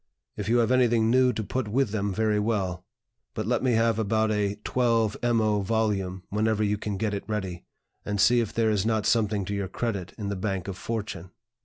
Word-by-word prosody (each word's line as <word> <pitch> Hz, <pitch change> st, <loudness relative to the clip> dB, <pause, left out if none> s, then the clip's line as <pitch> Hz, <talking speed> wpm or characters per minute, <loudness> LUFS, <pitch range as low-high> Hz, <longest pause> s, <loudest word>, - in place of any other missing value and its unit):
If 105 Hz, 0 st, -4 dB
you 120 Hz, -, +4 dB
have 120 Hz, 0 st, +2 dB
anything 120 Hz, -3 st, +3 dB
new 130 Hz, 0 st, +4 dB
to 110 Hz, -, -3 dB
put 130 Hz, +2 st, -3 dB
with 125 Hz, +1 st, +1 dB
them, 100 Hz, -1 st, -1 dB
very 105 Hz, +1 st, +1 dB
well; 95 Hz, -5 st, -1 dB, 0.5 s
but 110 Hz, -2 st, -2 dB
let 120 Hz, +1 st, +1 dB
me 130 Hz, -2 st, +2 dB
have 115 Hz, 0 st, +2 dB
about 110 Hz, 0 st, +1 dB
a 105 Hz, -1 st, 0 dB
12mo 115 Hz, -2 st, +1 dB
volume 100 Hz, -4 st, -1 dB
whenever 110 Hz, +1 st, +1 dB
you 105 Hz, 0 st, 0 dB
can 105 Hz, -2 st, -3 dB
get 105 Hz, +1 st, -1 dB
it 100 Hz, -, -3 dB
ready, 95 Hz, -5 st, -4 dB, 0.4 s
and 105 Hz, -1 st, -3 dB
see 120 Hz, +5 st, +5 dB
if 115 Hz, -3 st, -1 dB
there 115 Hz, -1 st, +1 dB
is 100 Hz, -3 st, +1 dB
not 110 Hz, -1 st, 0 dB
something 105 Hz, -4 st, +1 dB
to 100 Hz, -, -4 dB
your 100 Hz, -1 st, -2 dB
credit 100 Hz, -3 st, -3 dB
in 105 Hz, -3 st, -4 dB
the 100 Hz, -, -2 dB
bank 95 Hz, -1 st, -3 dB
of 95 Hz, -, -4 dB
Fortune. 105 Hz, -4 st, -5 dB
110 Hz, 205 wpm, -26 LUFS, 100-115 Hz, 0.5 s, see